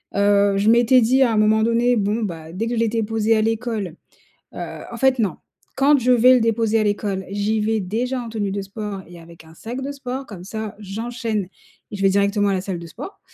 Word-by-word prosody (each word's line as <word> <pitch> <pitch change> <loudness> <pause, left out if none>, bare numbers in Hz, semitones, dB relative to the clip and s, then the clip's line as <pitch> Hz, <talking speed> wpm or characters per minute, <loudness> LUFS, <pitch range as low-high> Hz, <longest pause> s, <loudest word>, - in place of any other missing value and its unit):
heu, 200 0 +3
je 205 +2 +2
m'étais 240 +2 +5
dit 255 +4 +3
à 250 -3 +4
un - - +1
moment 215 +1 +3
donné: 235 +2 +2
«Bon, 210 +2 0
bah, 165 -5 -6
dès 220 +6 -2
que 240 - -2
je - - -1
l'ai 230 - +2
déposé 225 0 +1
à 215 - +2
l'école», 220 -5 -2 0.6
heu, - - -6
en - - -7
fait, 265 -1 +2
non, 205 -5 0 0.4
quand 280 +2 +4
je 255 0 +1
vais 250 +1 +6
le 250 - +3
déposer 225 -1 +1
à - - +1
l'école, 205 -2 -1
j'y 205 +2 0
vais 220 +1 0
déjà 240 +7 -2
en 235 - -7
tenue 215 -3 -3
de 200 0 -3
sport 200 0 -6
et 175 0 -13
avec 165 0 -15
un 160 0 -16
sac 235 +9 -6
de 280 +2 -4
sport 270 -1 -6
comme 185 -6 -10
ça, 220 +1 -5
j'enchaîne 225 +1 -3 0.5
et - - -4
je 195 - -5
vais 195 - +5
directement 200 +1 +2
à 195 - +1
la 185 - -1
salle 185 -2 -4
de 170 - -9
sport 380 - -10
220 Hz, 240 wpm, -21 LUFS, 200-235 Hz, 0.6 s, vais